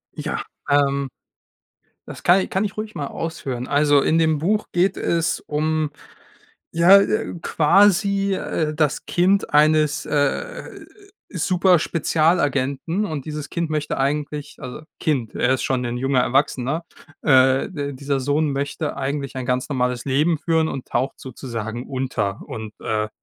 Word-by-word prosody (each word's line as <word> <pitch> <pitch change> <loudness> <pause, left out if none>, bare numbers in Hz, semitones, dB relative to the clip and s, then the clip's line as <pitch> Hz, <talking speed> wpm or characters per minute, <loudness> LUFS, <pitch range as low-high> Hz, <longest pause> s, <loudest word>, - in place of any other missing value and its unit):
Ja, - - -3 0.3
ähm. 140 -1 +2 1.0
Das - - -9
kann 180 +2 +5
i - - -3
kann 190 - -1
ich 200 - -5
ruhig 215 0 -6
mal 145 - -3
ausführen. 135 -7 -5
Also, 145 0 +4
in 160 - +2
dem 160 -2 +2
Buch 210 +7 +1
geht 180 +2 +1
es 165 -1 0
um 155 0 -1 0.8
ja, 175 +4 +7
äh, 215 +2 0
quasi, 200 +4 +3
äh, 155 -4 -2
das 150 -2 0
Kind 190 +1 +1
eines, 150 0 +3
äh, 150 - -2 0.5
Superspezialagenten. 165 -2 +1
Und 155 -8 -5
dieses 150 -2 -5
Kind 170 -2 -2
möchte 150 -1 -2
eigentlich 145 +1 -2
also 125 +4 -7 0.2
Kind, 130 -8 -1
er 130 - +2
ist - - -5
schon 130 -1 0
'nen 120 0 -3
junger 135 0 +2
Erwachsener. 135 +4 0 0.4
Äh, 130 -2 +4
d 145 -4 -4
dieser 140 +1 -2
Sohn 145 +3 +1
möchte 145 +2 -3
eigentlich 140 0 -3
ein 130 - -4
ganz 125 +2 -1
normales 125 -3 -1
Leben 150 +4 +2
führen 160 0 +1
und 135 - -5
taucht 135 +1 -2
sozusagen 120 -2 -6
unter 125 -7 -2
und, 110 -1 -7
äh, 110 -1 -1
145 Hz, 145 wpm, -22 LUFS, 135-165 Hz, 1.0 s, ja